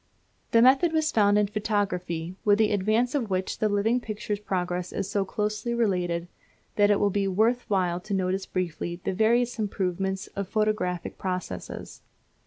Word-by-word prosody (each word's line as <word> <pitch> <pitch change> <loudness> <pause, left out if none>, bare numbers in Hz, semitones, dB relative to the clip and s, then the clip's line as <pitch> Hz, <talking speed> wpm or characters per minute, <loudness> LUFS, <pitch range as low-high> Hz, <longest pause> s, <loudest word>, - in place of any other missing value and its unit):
The 230 0 +5
method 275 +7 +5
was 315 -1 +2
found 205 -1 +4
in 210 - +4
photography, 190 -5 -2
with 205 -1 +4
the 220 -1 +3
advance 215 +5 +1
of 255 -7 -1
which 185 0 -2
the 215 - +2
living 210 +4 +2
picture's 215 -2 -4
progress 180 -3 -2
is 195 - -3
so 200 - 0
closely 210 +4 -2
related, 180 -6 0 0.5
that 205 -1 +4
it 205 - +4
will 205 - +2
be 200 0 0
worth 225 +6 +2
while 180 -3 +1
to 200 +3 -6
notice 190 0 -1
briefly 175 -1 -3
the - - -1
various 235 +4 +2
improvements 190 -1 -2
of 200 -1 -3
photographic 215 -5 -1
processes. 185 -1 -5
205 Hz, 165 wpm, -26 LUFS, 185-220 Hz, 0.5 s, The